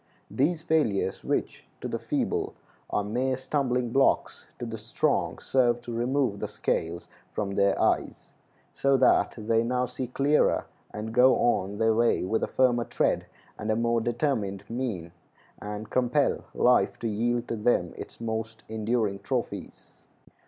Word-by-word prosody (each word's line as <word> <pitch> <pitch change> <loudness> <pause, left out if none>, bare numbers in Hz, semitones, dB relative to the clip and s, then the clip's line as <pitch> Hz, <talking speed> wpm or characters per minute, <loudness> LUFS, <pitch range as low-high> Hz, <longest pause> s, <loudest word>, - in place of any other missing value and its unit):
These 160 +4 +1
failures, 150 -13 +1
which - - -2
to - - -4
the - - -3
feeble - - -1 0.3
are 105 - 0
mere 125 +5 -1
stumbling 125 -3 0
blocks, 135 +2 +1
to 120 - -5
the 115 -1 -6
strong 110 +2 0
serve 120 -2 +2
to 120 0 -7
remove 120 -2 0
the - - -2
scales 85 +1 -2 0.3
from 100 -2 -2
their 100 0 +2
eyes, - - 0 0.4
so 140 0 +3
that 130 - +4
they 115 +1 +1
now 125 +1 0
see 125 0 -5
clearer, 140 +4 +2 0.2
and 110 +1 -6
go 125 +2 +6
on 100 -4 +1
their 110 0 +3
way 115 +1 +2
with 110 +5 0
a - - +1
firmer 120 -2 +2
tread - - 0 0.3
and 105 - -4
a 110 - +3
more 115 0 +1
determined 115 -5 -1
mien, 115 -9 -3 0.5
and 105 +1 -6
compel 130 +3 +1
life 125 0 +3
to 115 - -3
yield 120 +3 0
to - - -1
them 105 -6 +1
its - - -9
most 110 -1 -4
enduring 110 -2 -1
trophies. - - -5
115 Hz, 150 wpm, -27 LUFS, 105-125 Hz, 0.5 s, go